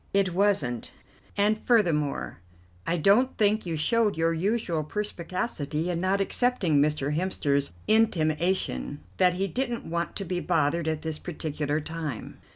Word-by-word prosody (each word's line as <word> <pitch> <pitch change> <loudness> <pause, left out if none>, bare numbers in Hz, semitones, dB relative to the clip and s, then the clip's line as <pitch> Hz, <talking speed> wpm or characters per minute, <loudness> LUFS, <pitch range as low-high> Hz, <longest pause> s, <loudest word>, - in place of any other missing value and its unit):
"It 195 -3 +2
wasn't, 175 - +1 0.5
and 210 +2 +2
furthermore, 165 - +1 0.5
I 175 - +1
don't 205 - +3
think 210 -2 +2
you 165 -2 -2
showed 215 +4 +2
your 165 0 +2
usual 175 -2 -1
perspicacity 170 -3 -3
in 170 -1 -2
not 190 +2 +1
accepting 195 - +2
Mr. 150 -1 +1
Hemster's 145 -5 0 0.2
intimation 165 - +1 0.2
that 180 -1 +4
he 195 +2 0
didn't 240 +3 -3
want 170 +1 -3
to 195 - -4
be 180 0 -2
bothered 165 -1 0
at 155 -1 -2
this 160 -1 -3
particular 150 -3 -3
time." 155 -5 -6
170 Hz, 140 wpm, -27 LUFS, 155-200 Hz, 0.5 s, that